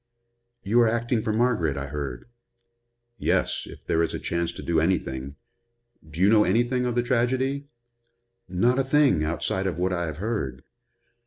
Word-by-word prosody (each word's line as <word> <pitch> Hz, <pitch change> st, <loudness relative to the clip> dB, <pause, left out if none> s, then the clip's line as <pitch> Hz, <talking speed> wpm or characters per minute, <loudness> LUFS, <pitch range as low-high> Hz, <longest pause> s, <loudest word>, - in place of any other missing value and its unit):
"You 115 Hz, +5 st, +3 dB
are 115 Hz, -, +5 dB
acting 115 Hz, 0 st, 0 dB
for 110 Hz, -, -1 dB
Margaret, 110 Hz, -, +1 dB
I 70 Hz, -, -3 dB
heard." 70 Hz, -3 st, -5 dB, 0.9 s
"Yes -, -, 0 dB
if -, -, -13 dB
there 80 Hz, -, +1 dB
is 85 Hz, -, -1 dB
a -, -, -4 dB
chance 85 Hz, -1 st, -2 dB
to -, -, -8 dB
do 85 Hz, -1 st, +1 dB
anything. 70 Hz, -6 st, -1 dB, 0.7 s
Do 80 Hz, +2 st, -9 dB
you 95 Hz, -, +5 dB
know 105 Hz, 0 st, +6 dB
anything 120 Hz, +5 st, +1 dB
of 120 Hz, -, -2 dB
the 120 Hz, -, +2 dB
tragedy?" 130 Hz, +3 st, 0 dB, 0.8 s
"Not 120 Hz, +9 st, +2 dB
a -, -, +3 dB
thing, 135 Hz, -, +3 dB
outside 85 Hz, +4 st, -1 dB
of 85 Hz, -4 st, -3 dB
what 90 Hz, +1 st, 0 dB
I 85 Hz, -1 st, -1 dB
have 80 Hz, -2 st, -5 dB
heard. 85 Hz, -, -3 dB
95 Hz, 170 wpm, -25 LUFS, 80-120 Hz, 0.9 s, know